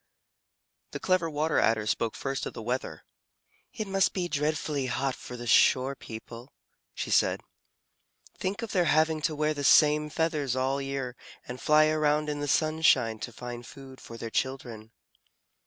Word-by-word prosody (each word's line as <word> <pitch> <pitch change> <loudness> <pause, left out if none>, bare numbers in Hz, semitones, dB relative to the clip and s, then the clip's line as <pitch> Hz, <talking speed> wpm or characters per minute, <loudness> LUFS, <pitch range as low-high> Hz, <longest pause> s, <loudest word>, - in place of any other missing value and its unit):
The - - -4
Clever 185 -3 +1
Water 155 +1 0
Adder 110 -1 +2
spoke 110 +1 -1
first 135 0 -3
of - - -7
the 115 - -7
weather. 125 +3 -3 0.7
"It 215 - -4
must 195 -1 +1
be 180 -2 -2
dreadfully 150 -3 -1
hot 130 +2 -1
for 125 - -9
the 120 - -7
shore 130 +3 +4
people," 115 +1 -10 0.4
she - - -4
said. - - +3 0.9
"Think 200 +5 -3
of 230 - -5
their 180 -2 +2
having 155 0 +2
to 155 0 -1
wear 155 +1 0
the 145 -1 -5
same 150 +1 +5
feathers 150 -5 -1
all 130 +1 0
the 140 - -4
year 135 -2 -4 0.3
and 125 +1 -7
fly 155 0 +5
around 150 -1 +1
in 145 -1 -3
the 145 - -3
sunshine 140 -7 +2
to 120 - -6
find 120 +1 -8
food 135 0 -12
for 115 - -10
their 115 -1 -6
children." 120 -5 -3
140 Hz, 170 wpm, -28 LUFS, 125-155 Hz, 0.9 s, same